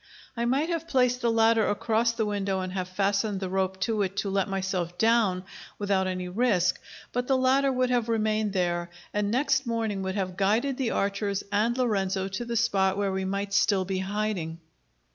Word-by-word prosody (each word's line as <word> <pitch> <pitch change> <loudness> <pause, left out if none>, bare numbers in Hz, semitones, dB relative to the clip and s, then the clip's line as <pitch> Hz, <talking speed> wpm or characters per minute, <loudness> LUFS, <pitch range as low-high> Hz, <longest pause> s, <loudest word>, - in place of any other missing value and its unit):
I 235 0 -1
might 275 +7 +1
have 330 -1 -2
placed 250 -3 +2
the 235 - +2
ladder 225 0 +3
across 225 +2 +1
the 230 -1 -1
window 200 -2 -1
and 185 0 -4
have 185 -2 -2
fastened 200 +2 0
the 190 -1 -3
rope 190 0 -1
to 220 -1 0
it 195 0 -2
to 200 -1 -1
let 195 0 0
myself 190 -3 -2
down, 220 -4 +2 0.3
without 195 -2 +1
any 185 -1 -3
risk; 185 -2 +1 0.3
but 245 0 -1
the 265 - +3
ladder 265 +2 +3
would 255 -1 +1
have 240 -2 +1
remained 215 -2 0
there, 175 -2 0 0.2
and 205 0 0
next 265 +2 +1
morning 225 -4 -1
would 190 0 -3
have 185 -2 -3
guided 225 +7 +1
the 260 -4 0
archers 200 -1 -1
and 220 +4 +1
Lorenzo 195 -6 0
to 195 +5 -4
the 235 0 -2
spot 195 -4 +2
where 200 -1 0
we 190 0 -2
might 200 +1 -3
still 195 -1 +3
be 190 0 -2
hiding. 190 -4 -2
205 Hz, 195 wpm, -27 LUFS, 190-235 Hz, 0.3 s, ladder